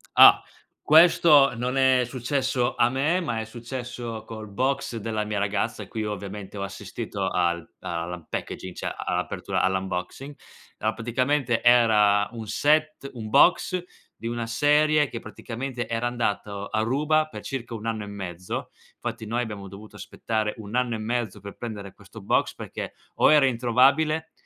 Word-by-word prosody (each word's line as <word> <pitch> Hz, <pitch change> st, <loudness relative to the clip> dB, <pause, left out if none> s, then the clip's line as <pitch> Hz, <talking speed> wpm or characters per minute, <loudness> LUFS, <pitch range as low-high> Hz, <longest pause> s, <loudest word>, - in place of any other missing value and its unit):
Ah, -, -, +9 dB, 0.4 s
questo 155 Hz, -3 st, +6 dB
non 125 Hz, +3 st, -2 dB
è 130 Hz, -1 st, +4 dB
successo 130 Hz, 0 st, -1 dB
a 120 Hz, -, +3 dB
me, 145 Hz, +7 st, +1 dB
ma 150 Hz, -11 st, -2 dB
è 110 Hz, -, -5 dB
successo 120 Hz, -1 st, -6 dB
col 110 Hz, -1 st, -8 dB
box 130 Hz, +4 st, -1 dB
della 110 Hz, -1 st, -2 dB
mia 105 Hz, -1 st, -3 dB
ragazza 100 Hz, 0 st, -1 dB
a -, -, -12 dB
cui 110 Hz, -1 st, -4 dB
ho 105 Hz, -, -2 dB
ovviamente 100 Hz, +1 st, -8 dB
ho 100 Hz, -, -3 dB
assistito 100 Hz, 0 st, -4 dB
al 85 Hz, -2 st, 0 dB
all' 85 Hz, 0 st, -4 dB
unpackaging 90 Hz, +1 st, -6 dB
a -, -, -3 dB, 0.2 s
apertura -, -, -2 dB
all' 95 Hz, 0 st, +2 dB
unboxing. 95 Hz, +9 st, -4 dB, 0.4 s
A 110 Hz, +1 st, 0 dB
praticamente 125 Hz, +1 st, 0 dB
era 105 Hz, -4 st, +5 dB
un 115 Hz, -2 st, -7 dB
set 150 Hz, +4 st, +1 dB
un 110 Hz, -3 st, -7 dB
box 180 Hz, -, +4 dB, 0.4 s
di 115 Hz, -, -5 dB
una 120 Hz, -1 st, -3 dB
serie 150 Hz, +4 st, +3 dB
che 115 Hz, -, -5 dB
praticamente 120 Hz, +2 st, -6 dB
era 115 Hz, +1 st, -1 dB
andato 105 Hz, -4 st, -2 dB
a 110 Hz, -, -1 dB
ruba 150 Hz, +6 st, +1 dB
per -, -, -9 dB
circa 120 Hz, -4 st, -5 dB
1 110 Hz, 0 st, -8 dB
anno 110 Hz, -2 st, -2 dB
e -, -, -8 dB
mezzo. 90 Hz, -3 st, -6 dB, 0.3 s
Fatti 110 Hz, -, -5 dB
noi 120 Hz, +3 st, -1 dB
abbiamo 105 Hz, -4 st, -6 dB
dovuto 105 Hz, +2 st, -12 dB
aspettare 110 Hz, +2 st, -3 dB
1 110 Hz, 0 st, -9 dB
anno 125 Hz, -2 st, +1 dB
e -, -, -5 dB
mezzo 115 Hz, -1 st, -2 dB
per 100 Hz, -1 st, -9 dB
prendere 105 Hz, -4 st, -7 dB
questo -, -, -13 dB
box, -, -, +1 dB
perché -, -, -6 dB, 0.2 s
o -, -, +5 dB
era 150 Hz, -3 st, +6 dB
introvabile 135 Hz, +6 st, +2 dB
115 Hz, 165 wpm, -25 LUFS, 105-130 Hz, 0.4 s, Ah